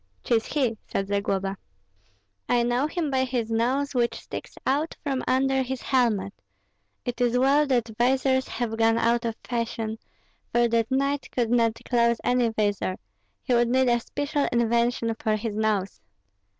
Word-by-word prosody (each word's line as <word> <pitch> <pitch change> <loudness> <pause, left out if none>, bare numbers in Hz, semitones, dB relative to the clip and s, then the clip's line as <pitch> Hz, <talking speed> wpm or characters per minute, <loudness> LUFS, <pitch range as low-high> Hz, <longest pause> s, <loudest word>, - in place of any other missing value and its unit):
"'Tis 225 -2 +1
he," 255 -7 0
said 195 - -2
Zagloba; 195 -1 -1 0.9
"I 240 -1 +3
know 245 +4 +1
him 315 -2 -2
by 260 -1 +2
his 245 -3 -2
nose, 260 +5 0
which 240 -2 +1
sticks - - -8
out 290 +5 0
from 270 -3 -1
under 265 +1 +2
his 260 0 -4
helmet. 215 -7 +1 0.7
It 245 0 -4
is 245 0 +2
well 280 +4 +4
that 240 -4 +1
visors 260 +1 +2
have 225 -2 -3
gone 225 0 +3
out 235 +1 +2
of 225 -1 -2
fashion, 225 -2 -3 0.5
for 240 0 +3
that 230 -1 +1
knight 275 +2 0
could 235 -2 0
not 230 -2 +2
close 235 -1 +3
any 245 -1 +2
visor; 205 -4 -1 0.5
he 250 - 0
would 240 0 +3
need 260 0 +3
a 240 0 +3
special 290 +4 -2
invention 235 0 +1
for 215 -1 +1
his 215 0 -4
nose." 210 -3 -1
240 Hz, 160 wpm, -25 LUFS, 225-260 Hz, 0.9 s, well